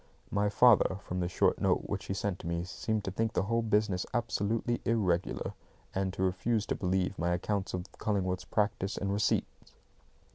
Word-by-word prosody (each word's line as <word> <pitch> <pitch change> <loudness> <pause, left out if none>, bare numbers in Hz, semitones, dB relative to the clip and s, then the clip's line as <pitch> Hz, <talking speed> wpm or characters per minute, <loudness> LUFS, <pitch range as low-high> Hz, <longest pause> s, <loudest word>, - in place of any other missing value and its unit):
My 100 0 +2
father, 105 -4 +5
from 90 - -3
the 90 - 0
short 90 - +2
note - - +2
which - - -3
he 95 - -3
sent 100 -2 -2
me, 85 0 -2
seemed 105 +4 -2
to 95 - -3
think 115 +4 -1
the - - +1
whole 115 +3 +1
business 105 -4 +1
absolutely 115 0 0
irregular, 95 -6 0 0.4
and 95 0 0
to 95 - -2
refuse 105 +4 +1
to - - -1
believe 95 +1 0
my 85 +1 +1
accounts 95 +2 -1
of 90 - -3 0.2
Cullingworth's 95 -3 -1
practice 100 0 0
and 100 0 -1
receipts. 105 +1 -1
100 Hz, 175 wpm, -31 LUFS, 90-110 Hz, 0.4 s, father